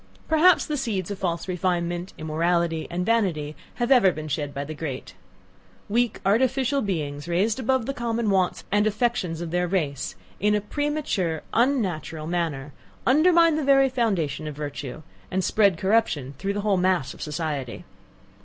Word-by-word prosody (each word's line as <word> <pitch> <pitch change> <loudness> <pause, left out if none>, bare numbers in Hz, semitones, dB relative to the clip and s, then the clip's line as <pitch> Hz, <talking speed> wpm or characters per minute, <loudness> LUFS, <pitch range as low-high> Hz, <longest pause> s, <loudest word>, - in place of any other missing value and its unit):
Perhaps 320 +2 +5
the 300 - -2
seeds 205 -7 -2
of 200 - -5
false 170 -2 -2
refinement, 175 0 -1
immorality, 165 +1 0
and 180 +1 -2
vanity 175 -10 0 0.2
have 240 +1 -1
ever 235 -8 +6
been 155 -2 -6
shed 145 0 -2
by 140 0 -4
the 155 - -6
great. 145 -4 -6 0.8
Weak, 235 +1 +1
artificial 260 +6 +2
beings 150 -7 -3
raised 200 +7 +1
above 260 -1 +1
the 275 - -2
common 235 -4 -1
wants 185 -2 +1
and 205 +1 +3
affections 215 -6 -1
of 170 -2 -5
their 180 0 +1
race, 155 -7 -2 0.2
in 210 +1 +3
a - - +2
premature 210 - -2
unnatural 190 - 0
manner, 155 -5 -2 0.3
undermine 330 +3 +5
the 310 - -1
very 270 -1 +5
foundation 185 - -1
of 150 - -5
virtue, 145 -1 -6 0.3
and 190 0 -1
spread 200 -4 +3
corruption 190 - +1
through 195 +1 -1
the 205 - -2
whole 200 -2 +2
mass 180 -6 +1
of - - -14
society! 150 -5 -4
185 Hz, 160 wpm, -25 LUFS, 160-235 Hz, 0.8 s, ever